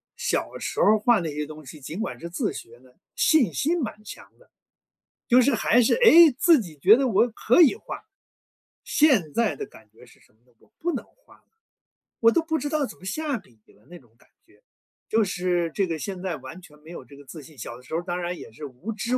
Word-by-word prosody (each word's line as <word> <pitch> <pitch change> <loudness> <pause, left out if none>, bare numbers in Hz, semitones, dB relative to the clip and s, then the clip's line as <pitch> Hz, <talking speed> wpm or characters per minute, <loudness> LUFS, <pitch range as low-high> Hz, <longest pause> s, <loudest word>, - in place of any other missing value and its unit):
小 - - -2
时 - - -5
候 - - +4
儿 215 +1 +4
画 230 -1 +3
那 160 -3 -4
些 150 0 -3
东 155 -1 -12
西， 145 +3 -12
尽 160 +9 -7
管 225 - -4
是 170 - -8
自 175 - -2
学 120 +1 -11
的， 125 -1 -23 0.2
信 310 -8 +3
心 330 +3 0
蛮 215 -3 -5
强 - - -11
的。 - - -24 0.8
就 250 +1 +5
是 280 0 +2
还 240 +2 +3
是， - - +3
诶， 340 - +7
自 335 -7 +5
己 165 -7 -9
觉 200 +10 +6
得 270 0 0
我 230 +3 +3
可 240 +7 +2
以 325 +3 +6
画。 - - -8 0.8
现 235 - +2
在 230 -3 0
的 - - -6
感 110 -1 -18
觉 120 - -18
是 120 - -21
什 - - -27
么 110 - -36
呢？ 125 - -30
我 215 - -28
不 345 - -1
能 - - -4
画 - - -25
了， - - -34 0.8
我 230 0 +6
都 335 - +2
不 320 -1 -2
知 290 - -4
道 300 -4 -1
怎 - - -12
么 185 - -15
下 290 +5 -2
笔 115 - -19
了 105 - -25
那 175 +1 -12
种 120 -4 -25
感 - - -26 0.2
觉。 395 +8 -28 0.5
就 220 0 +2
是 175 -2 -1
这 195 - +1
个 165 -3 -4
现 190 0 -6
在 175 -4 -3
完 185 - -11
全 150 -2 -17
没 155 +2 -17
有 175 - -9
这 140 - -16
个 145 - -14
自 155 +1 -11
信， 155 +2 -16
小 120 - -7
的 125 - -17
时 160 - -12
候 165 - 0
当 175 +1 -4
然 175 0 -3
也 - - -11
是 150 +6 -10
无 145 - -8
知 235 +5 -2
190 Hz, 265 characters per minute, -24 LUFS, 155-255 Hz, 0.8 s, 诶